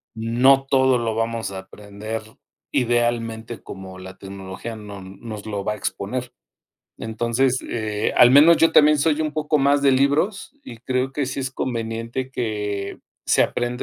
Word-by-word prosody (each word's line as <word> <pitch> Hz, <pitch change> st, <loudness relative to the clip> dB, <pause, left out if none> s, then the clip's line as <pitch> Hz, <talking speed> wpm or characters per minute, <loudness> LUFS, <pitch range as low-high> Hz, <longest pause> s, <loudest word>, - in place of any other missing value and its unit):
no 125 Hz, +5 st, +3 dB
todo 130 Hz, -2 st, +3 dB
lo 115 Hz, -1 st, -2 dB
vamos 115 Hz, -1 st, -2 dB
a 95 Hz, -, -6 dB
aprender 105 Hz, +3 st, -7 dB, 0.5 s
idealmente 120 Hz, -2 st, -1 dB
como 95 Hz, -1 st, -9 dB
la 95 Hz, 0 st, -10 dB
tecnología 95 Hz, +3 st, -8 dB
no 105 Hz, -2 st, -9 dB
nos 100 Hz, +3 st, -9 dB
lo 100 Hz, -2 st, -3 dB
va 105 Hz, -, -1 dB
a -, -, -6 dB
exponer. 120 Hz, +6 st, -4 dB, 0.7 s
Entonces, 120 Hz, +3 st, 0 dB
eh, 110 Hz, -2 st, -2 dB
al 120 Hz, -, +8 dB
menos 155 Hz, +5 st, +8 dB
yo 165 Hz, 0 st, +4 dB
también 150 Hz, 0 st, +6 dB
soy 155 Hz, +1 st, +2 dB
un 155 Hz, -1 st, -1 dB
poco 155 Hz, 0 st, 0 dB
más 140 Hz, +1 st, +3 dB
de 140 Hz, -1 st, +5 dB
libros 145 Hz, -, +1 dB
y 120 Hz, -, -10 dB
creo 130 Hz, +2 st, -2 dB
que 145 Hz, -1 st, -1 dB
sí 135 Hz, -, -4 dB
es 130 Hz, 0 st, -3 dB
conveniente 115 Hz, +1 st, -3 dB
que 105 Hz, -5 st, -3 dB, 0.3 s
se -, -, +4 dB
aprenda 120 Hz, 0 st, -2 dB
115 Hz, 160 wpm, -22 LUFS, 105-135 Hz, 0.7 s, al